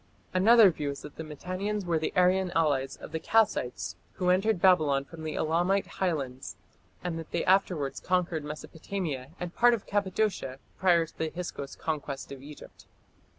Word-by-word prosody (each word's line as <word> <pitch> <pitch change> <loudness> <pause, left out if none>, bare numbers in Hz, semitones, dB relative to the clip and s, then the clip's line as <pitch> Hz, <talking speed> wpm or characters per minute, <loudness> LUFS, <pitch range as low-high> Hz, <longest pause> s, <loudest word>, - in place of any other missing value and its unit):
Another 210 +2 +7
view 150 -3 -3
is 140 - -6
that 150 - -10
the 160 - -4
Mitannians 185 +6 -4
were 170 -2 +1
the 155 - -2
Aryan 180 +1 +3
allies 140 -5 +1
of - - -10
the 160 - -2
Kassites 215 - +1 0.2
who 180 -2 +1
entered 195 +2 +2
Babylon 155 -7 +4
from 165 +2 -11
the 155 -1 -3
Elamite 175 +5 +1
highlands, 140 -8 -3 0.5
and 170 -2 -3
that 165 - -8
they 170 - -1
afterwards 180 -7 +2
conquered 180 -4 0
Mesopotamia 150 -1 -5
and 180 -1 -5
part 240 0 +5
of 215 - -9
Cappadocia 200 -8 -1 0.2
prior 175 -3 +4
to - - -19
the 160 - 0
Hyksos 155 -5 -6
conquest 145 -4 -4
of 135 -1 -8
Egypt. 145 +1 -13
170 Hz, 165 wpm, -29 LUFS, 150-190 Hz, 0.5 s, Another